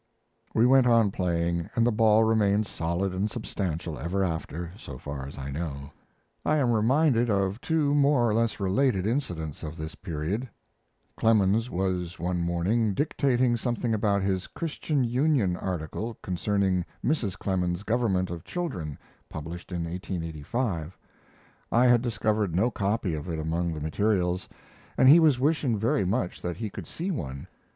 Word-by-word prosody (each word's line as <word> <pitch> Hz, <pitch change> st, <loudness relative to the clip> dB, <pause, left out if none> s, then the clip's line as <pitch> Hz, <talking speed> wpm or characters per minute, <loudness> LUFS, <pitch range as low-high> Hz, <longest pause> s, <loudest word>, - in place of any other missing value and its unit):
We 115 Hz, -, +5 dB
went 130 Hz, 0 st, +5 dB
on 115 Hz, -4 st, +4 dB
playing, 85 Hz, -2 st, -1 dB
and 115 Hz, -, +3 dB
the 120 Hz, -, +3 dB
ball 110 Hz, 0 st, +4 dB
remained 110 Hz, -2 st, +3 dB
solid 85 Hz, +2 st, -2 dB
and 95 Hz, +3 st, -1 dB
substantial 90 Hz, -, -4 dB
ever 95 Hz, +4 st, -1 dB
after, 85 Hz, 0 st, -3 dB
so 70 Hz, -, -9 dB
far 70 Hz, 0 st, -6 dB
as 70 Hz, -, -10 dB
I 70 Hz, 0 st, -5 dB
know. 70 Hz, -2 st, -5 dB, 0.5 s
I 155 Hz, -, +2 dB
am 130 Hz, -5 st, +2 dB
reminded 120 Hz, +2 st, +3 dB
of 100 Hz, +2 st, 0 dB
two 155 Hz, -3 st, +1 dB
more 140 Hz, -4 st, +4 dB
or 110 Hz, -, +1 dB
less 115 Hz, 0 st, 0 dB
related 100 Hz, +1 st, +1 dB
incidents 90 Hz, -, -2 dB
of 80 Hz, 0 st, -6 dB
this 80 Hz, 0 st, -5 dB
period. 95 Hz, +8 st, -3 dB, 0.7 s
Clemens 110 Hz, +1 st, +3 dB
was, 90 Hz, -2 st, -2 dB
one 90 Hz, +1 st, -1 dB
morning, 95 Hz, +5 st, +1 dB
dictating 130 Hz, -3 st, +2 dB
something 120 Hz, 0 st, -1 dB
about 100 Hz, -2 st, +1 dB
his 95 Hz, -1 st, -1 dB
Christian 155 Hz, -3 st, -2 dB
Union 125 Hz, -, +2 dB
article 95 Hz, +6 st, -4 dB
concerning 95 Hz, 0 st, 0 dB, 0.2 s
Mrs. 115 Hz, -, 0 dB
Clemens's 90 Hz, -2 st, -1 dB
government 105 Hz, -6 st, 0 dB
of 85 Hz, -2 st, -6 dB
children, 90 Hz, -, -4 dB, 0.3 s
published 80 Hz, +4 st, -7 dB
in 85 Hz, -1 st, -2 dB
1885. 85 Hz, -, -3 dB, 0.7 s
I 120 Hz, +2 st, +4 dB
had 120 Hz, -2 st, +5 dB
discovered 105 Hz, -5 st, 0 dB
no 110 Hz, +7 st, +2 dB
copy 100 Hz, -4 st, -1 dB
of 75 Hz, +3 st, -5 dB
it 80 Hz, -, -2 dB
among 85 Hz, +2 st, -1 dB
the 80 Hz, -, -4 dB
materials, 90 Hz, +3 st, 0 dB, 0.5 s
and 130 Hz, -, +5 dB
he 150 Hz, +5 st, +9 dB
was 150 Hz, -6 st, +4 dB
wishing 140 Hz, -4 st, +1 dB
very 105 Hz, -2 st, +1 dB
much 95 Hz, -1 st, -1 dB
that 90 Hz, -2 st, -3 dB
he 110 Hz, -1 st, -4 dB
could 90 Hz, -4 st, -8 dB
see 180 Hz, +4 st, -3 dB
one. 70 Hz, -, -5 dB
100 Hz, 155 wpm, -27 LUFS, 85-120 Hz, 0.7 s, he